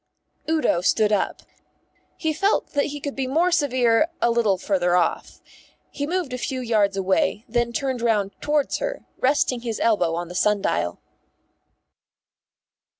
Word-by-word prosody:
Udo 310 - +2
stood 210 +3 +2
up. 205 - -1 0.7
He 315 -1 -1
felt 395 +6 +1
that 285 -1 +2
he 290 0 -5
could 285 0 -5
be 265 -1 -2
more 330 +7 +2
severe 255 -5 +3
a 235 - +2
little 225 -5 +2
farther 180 -2 +1
off. 175 -2 -1 0.5
He 285 0 -4
moved 345 -5 -2
a 250 - -3
few 260 +1 -3
yards 215 -5 +1
away, 195 +2 +1
and 235 - -18
then 240 0 +2
turned 260 +1 -2
round 210 -4 +1
towards 295 -1 0
her, - - -4
resting 255 -2 +1
his 230 -2 -4
elbow 180 -8 +2
on 175 +1 -4
the 175 - -9
sundial. 135 - 0
235 Hz, 150 wpm, -23 LUFS, 200-285 Hz, 0.7 s, severe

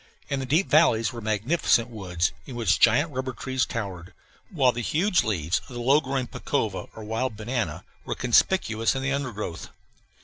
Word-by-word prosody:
In 140 - -1
the 130 - -4
deep 160 +9 +2
valleys 125 -7 +4
were 120 - -7
magnificent 115 +3 +1
woods, 95 -6 -2 0.2
in 130 - -7
which 110 -6 +1
giant 145 +8 +4
rubber 130 0 -3
trees 130 +2 -1
towered, 95 -5 -5 0.4
while 140 - +3
the 120 - -4
huge 180 - +2
leaves 85 -6 0
of 125 - -10
the - - -4
low 135 +5 +4
growing 135 -2 -2
pacova, - - -3
or 110 - -8
wild 110 +1 -2
banana, 120 +2 -3 0.2
were - - -4
conspicuous 115 -3 +2
in 135 - -3
the 140 - 0
undergrowth. 110 -11 -4
120 Hz, 175 wpm, -25 LUFS, 110-135 Hz, 0.4 s, valleys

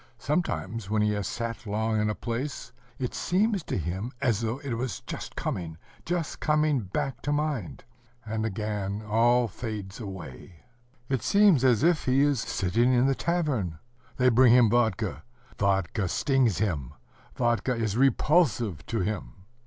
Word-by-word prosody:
Sometimes 120 - -2
when 105 0 +2
he 105 - +2
has 105 -2 -2
sat 115 -1 -4
long 110 +1 0
in 105 - +1
a 105 - -1
place, 125 +4 -4 0.3
it 125 -2 -3
seems 200 +2 +1
to - - -2
him 95 +7 -3
as 120 -6 +1
though 115 +2 -1
it 135 -4 -3
were 120 +3 -1 0.5
coming, 80 -3 -4 0.3
just 170 -2 -2
coming 150 -2 +2
back 125 +5 -3
to 145 - -2
mind,... 145 - -2 0.4
and 110 0 -2
again 105 -1 -3
all 120 +3 +3
fades 105 -2 -6
away. 90 - -9 0.4
It 130 -3 -1
seems 200 - +4
as 125 -1 +4
if 170 -1 +3
he 130 +1 +3
is 145 -3 +3
sitting 110 +4 +1
in 125 +1 +4
the 135 - +3
tavern: 135 - -1 0.4
they 125 0 +4
bring 120 0 +6
him 120 -4 +6
vodka; 110 -4 +1 0.4
vodka 95 0 +1
stings 130 - +2
him; 85 - -2 0.4
vodka 120 +1 +1
is 110 -3 -1
repulsive 125 - +2
to 115 -3 -1
him. 105 +2 -3
115 Hz, 155 wpm, -27 LUFS, 105-135 Hz, 0.5 s, bring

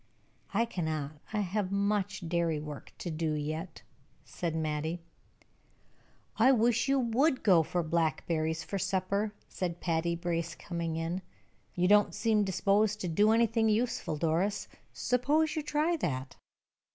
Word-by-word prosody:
"I 230 +4 +2
cannot. 155 -8 -3
I 210 -1 0
have 195 0 -1
much 200 -3 0
dairy 165 -2 0
work 150 -1 -8
to 175 - -4
do 155 0 -1
yet," 155 +3 -4 0.4
said 170 -2 -3
Mattie. 160 +2 -2 1.3
"I 250 +4 +6
wish 235 0 +3
you 275 0 +3
would 255 +4 +2
go 180 -5 +6
for 175 +2 -1
blackberries 160 0 0
for 195 +4 -4
supper," 195 +2 0 0.2
said 175 -2 -4
Patty 170 0 0
Brace, 170 -1 -2
coming 170 -2 -4
in. 165 +3 -2 0.5
"You 180 0 +2
don't 210 +1 +4
seem 220 -1 +2
disposed 200 +2 +2
to 180 - -2
do 205 +6 +3
anything 225 0 +3
useful, 230 -7 0
Doris 170 +6 0 0.2
suppose 295 +5 +1
you 310 - 0
try 305 +3 +1
that." 130 - -3
185 Hz, 140 wpm, -31 LUFS, 165-220 Hz, 1.3 s, I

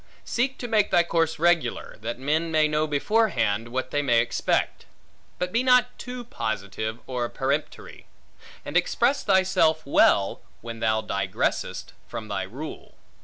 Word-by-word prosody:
Seek 260 +3 -1
to 245 - -5
make 215 -3 +2
thy 175 - +4
course 165 -1 0
regular, 165 -6 +1
that 115 +2 -4
men 155 +5 0
may 155 -1 +4
know 150 +1 0
beforehand, 145 - +1
what 130 +2 -3
they 145 - +1
may 120 -5 +3
expect; 115 +1 -1 0.5
but 180 0 -2
be 230 - +2
not 250 -1 +4
too 250 -1 -6
positive 110 - -4
and 125 -2 -3
peremptory; 140 +3 -3 0.6
and - - -7
express 260 +4 +2
thyself 185 -5 +3
well, 100 -7 +3 0.2
when 115 0 -7
thou 110 -1 +1
digressest 95 -1 -2
from 110 -1 -7
thy 100 -1 -2
rule. 125 +12 -8
150 Hz, 145 wpm, -25 LUFS, 115-190 Hz, 0.6 s, thy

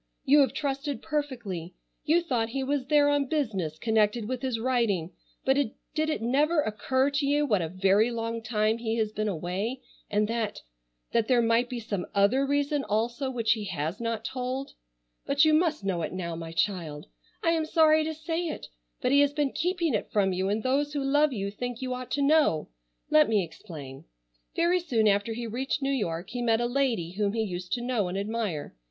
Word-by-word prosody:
You 290 +2 +6
have 275 - +4
trusted 280 0 -2
perfectly. 235 - -3 0.3
You 335 +3 +3
thought 240 -8 0
he 270 +3 -2
was 275 -1 -1
there 290 0 +5
on 290 -1 +2
business 205 - -1
connected 220 +1 +1
with 255 0 -3
his 255 -3 -1
writing, 225 -9 0 0.3
but 265 +1 +3 0.4
did 310 0 0
it 305 - -2
never 295 +7 +2
occur 260 +3 +1
to 280 0 0
you 295 +1 +2
what 210 -9 +2
a 165 - -2
very 195 +5 +3
long 230 -1 -3
time 220 0 0
he 225 -1 -1
has 215 -2 0
been 215 0 -2
away 195 +7 -2 0.3
and 210 0 +1
that—that - - -4
there 245 -2 +4
might 230 +2 +2
be 250 -2 -4
some 205 -5 -4
other 235 +8 +3
reason 285 0 +1
also 235 +5 -1
which 235 -4 0
he 220 -3 +1
has 165 -1 -3
not 230 -1 -2
told? 255 +2 -3 0.5
But 285 +2 +4
you 310 - +4
must 310 - +2
know 180 -3 0
it 160 - -3
now, 170 -3 -4
my 165 0 -6
child. 165 -4 -2 0.4
I 330 - +3
am 325 -1 +1
sorry 315 -1 +5
to 315 0 -3
say 330 +2 -2
it, - - -6 0.3
but 250 - +1
he 280 - +6
has 285 0 +4
been 290 -2 0
keeping 340 -3 0
it 210 - -2
from 195 -3 +2
you, 190 +1 0
and 215 +2 -1
those 285 +3 +1
who 285 -2 -1
love 290 +2 +3
you 200 -4 -3
think 245 +3 -5
you 255 -1 -3
ought 250 0 -6
to 285 - +1
know. 290 - +3 0.4
Let 155 +7 +6
me 210 -3 +3
explain. 155 -6 -10 0.5
Very 345 +2 +3
soon 240 -11 +1
after 205 +2 +2
he 235 +1 -4
reached 260 +5 -2
New 270 - +1
York 180 -7 -2
he 245 0 -3
met 225 -2 +2
a 240 - +1
lady 240 -9 0
whom 200 +1 -1
he 225 -1 0
used 180 -3 -5
to 245 - -1
know 240 -6 0
and 180 +2 -3
admire. 205 -6 -3
235 Hz, 205 wpm, -28 LUFS, 200-280 Hz, 0.5 s, You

